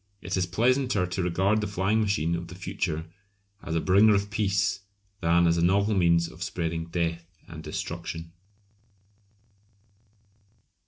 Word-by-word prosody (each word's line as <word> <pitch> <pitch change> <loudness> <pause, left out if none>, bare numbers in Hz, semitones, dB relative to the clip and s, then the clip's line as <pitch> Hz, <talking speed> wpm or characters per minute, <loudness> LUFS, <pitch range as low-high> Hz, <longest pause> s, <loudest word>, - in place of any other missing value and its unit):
It 95 - -4
is 90 -1 0
pleasanter 120 +1 +1
to 90 +1 -3
regard 95 +5 +1
the 105 - -2
flying 100 +3 +1
machine 95 -6 0
of 85 0 -3
the 90 - -10
future 90 -4 -3 0.6
as 80 - -4
a - - +2
bringer 100 +5 +5
of 100 +1 -1
peace 100 -1 +1 0.4
than 85 +1 +3
as 85 0 +3
a - - +1
novel 100 +4 +3
means 85 -3 +3
of 85 +1 -14
spreading 85 -4 -3
death 85 0 -3
and - - -9
destruction. 80 0 -5
90 Hz, 145 wpm, -27 LUFS, 85-100 Hz, 0.6 s, bringer